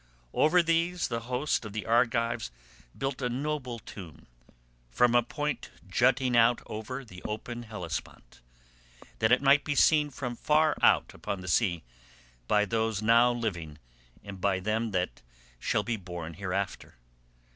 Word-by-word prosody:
"Over 175 +3 +4
these 170 +2 +1
the 115 -1 -1
host 130 +3 0
of 105 -2 -8
the 105 -1 -4
Argives 115 0 +1 0.5
built 135 0 -3
a 125 - 0
noble 130 -1 -3
tomb, 85 -8 -11 0.7
on 120 -1 +5
a 120 - +6
point 150 +4 -4 0.2
jutting 125 +5 +2
out 120 0 +4
over 130 +5 -6
the 90 -5 -12
open 115 +3 -5
Hellespont, 90 - -7 0.8
that 110 - +2
it 125 +2 +4
might 140 +1 +5
be 145 - -2
seen 150 0 +4
from 125 -3 -5
far 155 +3 +2
out - - +4
upon 100 - -5
the 90 - -9
sea 85 -1 +1 0.6
by 105 0 +3
those 110 -1 -1
now 115 +2 +5
living 90 -11 -4 0.5
and 100 -2 -9
by 95 -1 +1
them 110 +4 -1
that 90 -3 -2 0.4
shall - - 0
be 120 -2 -2
born 90 -4 -7
hereafter. 95 +2 -4
115 Hz, 145 wpm, -29 LUFS, 100-130 Hz, 0.8 s, a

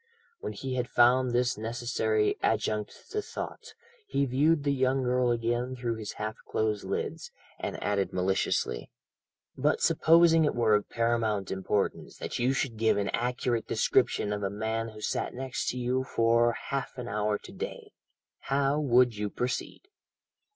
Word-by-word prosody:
When - - -5
he 130 -1 -4
had 125 -1 -1
found 125 +1 +4
this 120 -1 +1
necessary 110 -1 0
"adjunct 105 -1 -1
to 425 - -1
thought," 420 - -7 0.3
he 140 - +1
viewed 145 +4 +2
the 140 -1 +2
young 130 0 +1
girl 125 0 +2
again 120 +2 0
through 120 -2 -2
his 110 -2 -6
half 110 +1 -4
closed 110 -1 0
lids, - - -3 0.3
and - - -4
added 100 -1 0
maliciously: 90 -9 0 0.7
"But 145 +3 +1
supposing 165 0 +5
it 150 - +1
were 115 -3 +3
of 105 -1 +1
paramount 115 -4 0
importance 95 +1 -2
that - - -4
you 125 +2 +2
should 135 -4 -1
give 110 -1 +3
an 100 -1 0
accurate 120 -1 -1
description 105 - +2
of 105 - -3
a 100 - -1
man 110 +2 -2
who 110 -1 -11
sat - - -2
next 130 0 -3
to 125 - -3
you 125 +1 0
for 115 -1 +3
half 135 +1 -4
an 125 -1 -5
hour 105 -1 0
to - - -13
day, - - -7 0.5
how 140 +1 +1
would 125 -4 +4
you 105 0 -2
proceed?" 125 +4 -3
120 Hz, 160 wpm, -29 LUFS, 110-130 Hz, 0.7 s, supposing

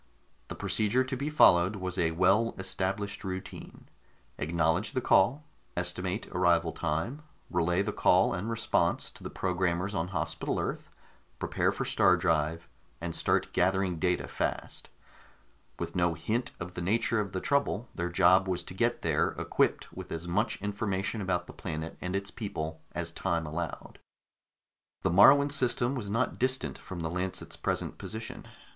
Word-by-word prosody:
The - - -6
procedure 110 +4 +1
to 130 +1 -3
be 140 +4 -2
followed 95 - +5
was 95 -1 -3
a 85 -2 +3
well 95 +7 +3
established 95 +2 -2
routine: 95 -1 -7 0.5
acknowledge 80 - +1
the 130 - +1
call, 135 +3 +3 0.3
estimate 90 +3 -1
arrival 85 -2 +3
time, 80 - -2 0.3
relay 90 +2 +2
the 105 - -2
call - - +4
and 95 +6 -3
response 115 0 0
to - - -14
the - - -5
programmers 90 +1 -1
on 80 -2 -1
Hospital 90 -4 -2
Earth, - - -3 0.5
prepare - - 0
for - - -3
star - - +4
drive, 80 +2 0 0.3
and 85 0 -4
start - - +1
gathering 95 -1 +1
data 90 +1 +1
fast. - - -4 0.9
With - - -5
no 85 -2 +2
hint 120 +8 -1
of 90 0 -6
the 90 - -5
nature 110 +4 +2
of 100 -3 -2
the 95 - -2
trouble, 125 -2 0
their 85 0 -2
job 90 +2 +5
was 90 -2 -1
to - - -8
get 120 +5 0
there, - - +1
equipped - - 0
with - - -8
as 85 +1 -4
much 105 +6 0
information 100 0 -2
about 90 -2 -1
the - - -11
planet 80 -2 -5
and 90 +1 -3
its 100 +1 -2
people 80 -7 -5
as 85 -1 -3
time 85 -1 -1
allowed. 80 +2 -5 1.0
The - - +2
Moruan 140 +10 +7
system 125 -2 +1
was 115 -7 -4
not 115 +5 0
distant 130 +1 0
from 95 -3 -7
the 80 - -2
Lancet's 90 +1 -3
present - - -2
location. 110 +1 -7
95 Hz, 160 wpm, -30 LUFS, 85-110 Hz, 1.0 s, Moruan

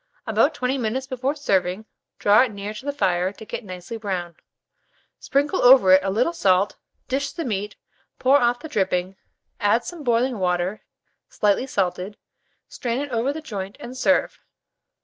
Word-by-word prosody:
About 230 +7 +2
20 260 +1 -1
minutes 250 +3 -2
before 260 +2 -2
serving, 195 -7 0 0.3
draw 205 +2 +5
it 255 -3 +1
near 205 +1 -6
the 260 +7 -4
fire 185 -9 0
to 220 - -12
get - - -6
nicely 185 +3 -7
brown; 185 -5 -4 0.8
sprinkle 285 +1 0
over 245 -7 +7
it 190 - +6
a 195 - -1
little 240 - +1
salt, 195 - +2 0.3
dish 275 +2 -1
the 335 - -5
meat, 210 -3 -3 0.4
pour 265 +2 +4
off 245 -2 +1
the 315 - -7
dripping, 190 - -1 0.4
add 205 +4 +2
some 345 -4 -7
boiling 240 -1 +1
water 180 +2 -1 0.5
slightly 210 +5 +1
salted, 190 -2 -2 0.5
strain 240 -1 -3
it 285 -1 -4
over 240 +3 0
the 315 +2 -6
joint, 200 -9 -6
and 250 - -8
serve. 270 +2 +1
225 Hz, 160 wpm, -23 LUFS, 195-265 Hz, 0.8 s, over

